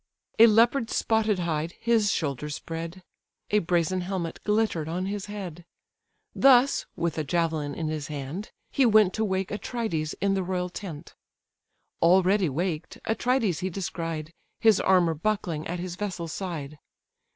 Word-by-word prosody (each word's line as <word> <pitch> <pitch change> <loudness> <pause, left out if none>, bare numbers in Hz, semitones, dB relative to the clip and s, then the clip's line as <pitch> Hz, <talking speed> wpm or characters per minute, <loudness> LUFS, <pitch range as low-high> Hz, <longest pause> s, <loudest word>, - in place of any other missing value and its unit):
A 230 - +10
leopard's 230 +2 +3
spotted 220 -2 +2
hide 165 -1 -2
his 225 -3 +2
shoulders 150 -1 -2
spread: 165 +3 -6 0.5
A 210 - +4
brazen 175 0 0
helmet 180 -2 -4
glitter'd 210 -7 0
on 180 +3 -2
his 205 +1 -4
head: 185 -5 -7 0.7
Thus 270 0 +5
(with 165 -2 -1
a - - 0
javelin 160 -2 -1
in 160 - -3
his 155 -2 -3
hand) 150 +7 -5 0.2
he 275 - +3
went 215 -5 +5
To 220 - -1
wake 190 -2 -1
Atrides 205 -8 -3
in 200 0 +1
the 195 - 0
royal 180 0 -2
tent. 175 -5 -8 0.9
Already 185 +1 +4
waked, 160 +2 -3
Atrides 225 - +1
he 185 - -2
descried, 165 -3 -4 0.3
His 220 -3 +5
armour 180 -3 +3
buckling 165 -2 -2
at 175 - -3
his 175 0 -5
vessel's 180 -4 -4
side. 155 -6 -5
180 Hz, 145 wpm, -27 LUFS, 165-210 Hz, 0.9 s, A